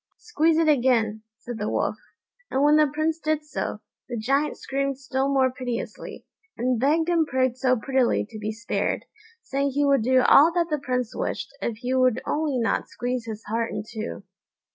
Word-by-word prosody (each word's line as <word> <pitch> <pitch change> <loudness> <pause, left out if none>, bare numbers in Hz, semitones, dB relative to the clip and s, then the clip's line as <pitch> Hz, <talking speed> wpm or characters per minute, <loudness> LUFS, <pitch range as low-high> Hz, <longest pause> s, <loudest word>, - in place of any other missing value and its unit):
"Squeeze 330 -8 +1
it 325 -1 +3
again," 240 -6 +2 0.2
said 240 -1 -7
the 210 - -2
Wolf; - - -1 0.5
and 270 - +1
when 295 +1 +6
the 305 -1 +4
Prince 310 +2 -1
did 310 -1 -1
so, 265 -7 -4 0.3
the 240 - -3
Giant 275 +7 0
screamed 275 0 -2
still 265 +1 -1
more 265 -2 +3
piteously, 250 -2 -6 0.3
and 250 0 0
begged 310 +6 +2
and 335 -3 +2
prayed 260 -2 +1
so 255 0 +2
prettily 260 +2 +1
to 215 - -8
be 215 0 -3
spared, 230 +1 -2 0.4
saying 275 +1 -1
he 285 +1 +2
would 275 -3 +4
do 255 +3 +4
all 310 +4 +7
that 340 -2 0
the 300 - +1
Prince 250 -3 -2
wished - - -4
if 230 -2 -2
he 250 +2 -3
would 255 -2 +3
only 300 -3 0
not 225 -4 0
squeeze 245 -1 -3
his 220 -1 -6
heart 230 +2 -2
in 210 - -4
two. 220 0 -6
260 Hz, 185 wpm, -25 LUFS, 235-295 Hz, 0.5 s, all